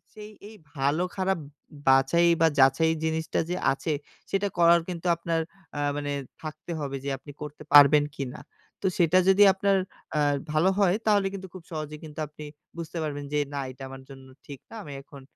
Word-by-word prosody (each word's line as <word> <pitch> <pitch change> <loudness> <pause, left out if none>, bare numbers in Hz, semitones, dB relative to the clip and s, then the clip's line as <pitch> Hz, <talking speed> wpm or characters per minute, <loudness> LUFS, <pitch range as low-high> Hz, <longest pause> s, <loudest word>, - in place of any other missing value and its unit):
সেই 210 0 -10 0.2
এই 220 - -13 0.2
ভালো-খারাপ 180 +7 0
উম - - -13 0.4
বাছাই 135 +6 +4
বা 165 - +6
যাচাই 135 +4 +5
জিনিসটা 160 0 -1
যে - - 0 0.2
আছে 150 +3 -3 0.4
সেটা 195 +1 0
করার 170 0 +6
কিন্তু 180 -1 -5
আপনার 165 -1 -1 0.4
আ - - -2 0.2
মানে 145 0 -3 0.3
থাকতে 155 +2 -7
হবে 140 -2 -3
যে - - -3
আপনি 145 - -12
করতে 150 0 -8
পারবেন 145 0 +8
কিনা? 130 -2 -5 0.4
তো - - +1
সেটা 175 +1 +4
যদি 195 +2 +6
আপনার 195 +1 +1 0.4
আ - - +2 0.3
ভালো 155 +4 +3
হয় 190 -3 +4
তাহলে 205 -2 +3
কিন্তু 190 -1 -7
খুব 185 - -9
সহজেই 155 -1 -5
কিন্তু 150 -1 -11
আপনি 150 +1 -11 0.3
বুঝতে 170 0 -6
পারবেন 145 -2 -4
যে 150 - +1 0.2
না - - -2
এটা 130 +1 -12
আমার 135 0 -10
জন্য 135 -1 -12 0.2
ঠিক 140 -2 -9
না। - - -11
আমি 145 -5 -9
এখন 140 0 -14
155 Hz, 185 wpm, -26 LUFS, 145-180 Hz, 0.4 s, পারবেন